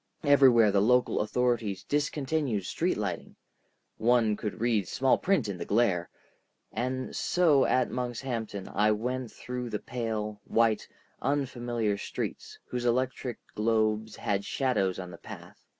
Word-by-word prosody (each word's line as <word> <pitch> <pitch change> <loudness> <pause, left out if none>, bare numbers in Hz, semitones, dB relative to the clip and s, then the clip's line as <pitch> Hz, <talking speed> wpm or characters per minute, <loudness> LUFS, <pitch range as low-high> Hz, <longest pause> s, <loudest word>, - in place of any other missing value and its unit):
Everywhere 130 -7 +6
the 100 0 +3
local 125 +4 +3
authorities 110 -2 0
discontinued 145 - -1
street - - 0
lighting—one 115 -2 -2
could 105 0 -5
read 110 -5 +1
small 130 +6 +2
print 185 - +1
in 95 -3 -4
the - - -2
glare,—and 120 +5 -3
so 160 -7 +3
at 130 -1 +2
Monkshampton 120 -5 -4
I 105 +2 +3
went 125 +3 -3
about - - -20
through 125 -1 -4
pale, 105 -2 -3
white, 115 -2 +2 0.3
unfamiliar 120 -6 -1
streets, - - -5
whose 125 -1 -4
electric 125 0 0 0.2
globes 110 0 +1
had 100 -1 -1
shadows 105 -8 0
on 90 -1 -6
the 85 - -11
path. - - -11
120 Hz, 125 wpm, -29 LUFS, 105-130 Hz, 0.3 s, Everywhere